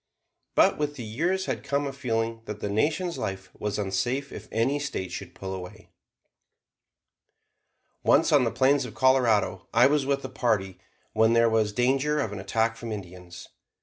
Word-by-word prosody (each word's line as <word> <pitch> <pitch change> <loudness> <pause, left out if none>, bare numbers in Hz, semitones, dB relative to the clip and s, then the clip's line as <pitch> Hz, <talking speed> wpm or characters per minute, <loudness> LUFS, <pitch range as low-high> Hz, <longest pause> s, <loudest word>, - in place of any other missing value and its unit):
But - - +4
with 145 -1 -1
the 125 - -6
years 170 - -1
had - - -3
come 140 0 -1
a 140 - -4
feeling 115 -4 -2
that 105 -1 -6
the 105 - -3
Nation's 155 - 0
life 95 -1 -5
was 105 -1 -3
unsafe 120 +8 -1
if - - -9
any 130 +6 +1
State 140 -10 -4
should - - -7
pull 95 0 -6
away. 90 -1 -9 2.1
Once, - - +4
on - - +5
the - - +1
plains 140 +2 +3
of - - -8
Colorado, 120 -8 +2
I 120 +2 +5
was 140 0 +2
with 140 -1 0
a - - -5
party 105 -8 -1 0.3
when 110 +1 +4
there 115 -1 +4
was 110 -2 +2
danger 135 +6 +1
of 110 -8 -1
an 100 - -6
attack 110 +4 0
from 115 -1 -6
Indians. 90 -3 -9
115 Hz, 175 wpm, -26 LUFS, 105-140 Hz, 2.1 s, on